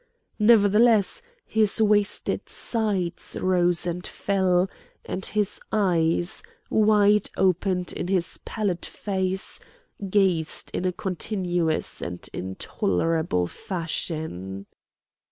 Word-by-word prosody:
Nevertheless 210 Hz, -1 st, +5 dB, 0.2 s
his 220 Hz, -2 st, +1 dB
wasted 210 Hz, -1 st, +1 dB
sides 200 Hz, -7 st, -2 dB
rose 180 Hz, -2 st, +3 dB
and 175 Hz, +1 st, -3 dB
fell, 190 Hz, -2 st, +1 dB, 0.4 s
and 190 Hz, -, -4 dB
his 210 Hz, -1 st, 0 dB
eyes, 175 Hz, -4 st, +1 dB, 0.3 s
wide 210 Hz, -1 st, +4 dB
opened 185 Hz, -1 st, +1 dB
in -, -, -4 dB
his 185 Hz, -2 st, -1 dB
pallid 200 Hz, -6 st, -2 dB
face, 190 Hz, -1 st, -2 dB, 0.5 s
gazed 185 Hz, -5 st, +1 dB
in 185 Hz, -, -2 dB
a 185 Hz, -, +2 dB
continuous 180 Hz, -3 st, -1 dB
and 90 Hz, +1 st, -5 dB
intolerable 95 Hz, -, -1 dB
fashion. 155 Hz, -, -4 dB
185 Hz, 90 wpm, -25 LUFS, 170-205 Hz, 0.5 s, Nevertheless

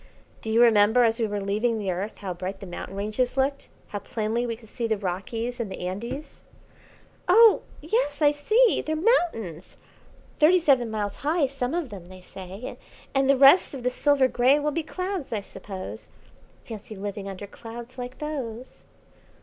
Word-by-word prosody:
"Do 220 Hz, -, -5 dB
you 230 Hz, +2 st, +5 dB
remember 220 Hz, +1 st, +5 dB
as 225 Hz, 0 st, +2 dB
we 225 Hz, -, +1 dB
were 205 Hz, 0 st, -3 dB
leaving 215 Hz, +4 st, 0 dB
the 200 Hz, -3 st, -2 dB
Earth, 190 Hz, +5 st, -4 dB
how 190 Hz, -3 st, -4 dB
bright 185 Hz, +2 st, -5 dB
the 200 Hz, -, -8 dB
mountain 180 Hz, +1 st, -7 dB
ranges 215 Hz, +6 st, -1 dB
looked; 275 Hz, +1 st, 0 dB, 0.2 s
how 205 Hz, -, -4 dB
plainly 220 Hz, +4 st, -2 dB
we 230 Hz, -, -2 dB
could 225 Hz, 0 st, -17 dB
see 235 Hz, 0 st, -3 dB
the 220 Hz, -1 st, 0 dB
Rockies 220 Hz, +6 st, -4 dB
and 220 Hz, -5 st, -3 dB
the -, -, -6 dB
Andes?" 235 Hz, +11 st, -6 dB, 0.9 s
"Oh, 445 Hz, +4 st, +7 dB, 0.2 s
yes, 300 Hz, -, 0 dB
I 295 Hz, -2 st, +5 dB
see; 430 Hz, +11 st, +3 dB
they're 315 Hz, -, -2 dB
mountains; 310 Hz, -, 0 dB, 0.6 s
thirty 340 Hz, +4 st, +6 dB
seven 265 Hz, -8 st, +3 dB
miles 210 Hz, -2 st, -3 dB
high, 305 Hz, +1 st, +1 dB
some 270 Hz, +1 st, -3 dB
of 340 Hz, -7 st, -2 dB
them, 185 Hz, -5 st, -10 dB
they 185 Hz, 0 st, -11 dB
say; 190 Hz, +5 st, -9 dB, 0.3 s
and 270 Hz, 0 st, +2 dB
the 275 Hz, -, +5 dB
rest 280 Hz, +4 st, +6 dB
of 255 Hz, -, -7 dB
the 250 Hz, -, +1 dB
silver 280 Hz, 0 st, +3 dB
grey 255 Hz, +3 st, +4 dB
will 300 Hz, 0 st, 0 dB
be 330 Hz, -, -1 dB
clouds, 365 Hz, 0 st, -4 dB
I 215 Hz, -3 st, -1 dB
suppose. 195 Hz, -1 st, -8 dB, 0.6 s
Fancy 215 Hz, -1 st, -8 dB
living 200 Hz, 0 st, -5 dB
under 195 Hz, +1 st, -7 dB
clouds 235 Hz, +4 st, -10 dB
like 250 Hz, +1 st, -6 dB
those." 260 Hz, -6 st, -6 dB
235 Hz, 180 wpm, -26 LUFS, 205-285 Hz, 0.9 s, Oh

